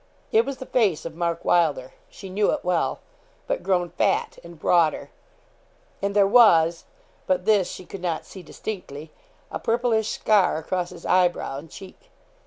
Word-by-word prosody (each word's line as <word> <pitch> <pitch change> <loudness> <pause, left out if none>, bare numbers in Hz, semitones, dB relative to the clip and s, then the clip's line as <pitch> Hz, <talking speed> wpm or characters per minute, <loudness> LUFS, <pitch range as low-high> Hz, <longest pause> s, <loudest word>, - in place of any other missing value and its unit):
It 450 0 +4
was 275 - -4
the 260 - -8
face 210 -13 +1
of 165 - -5
Mark 170 0 -3
Wylder 150 -7 +1 0.2
she 195 - -11
knew 200 +2 +1
it - - -4
well 180 -2 0 0.4
but - - -2
grown 180 -3 0
fat - - 0
and 170 -1 -12
broader, 165 -1 +2 0.9
and 200 +1 -2
there 200 -1 +5
was 175 -7 +5 0.4
but 185 -1 0
this 210 -4 +3
she 185 - -9
could 195 - -9
not 170 -3 -2
see 190 - -11
distinctly 160 -4 -8 0.4
a - - -4
purplish 225 -2 0
scar 205 -7 +2
across 175 +2 -3
his 175 -2 -12
eyebrow 175 -6 +1
and 160 +3 -13
cheek. 195 - -13
180 Hz, 165 wpm, -24 LUFS, 170-210 Hz, 0.9 s, there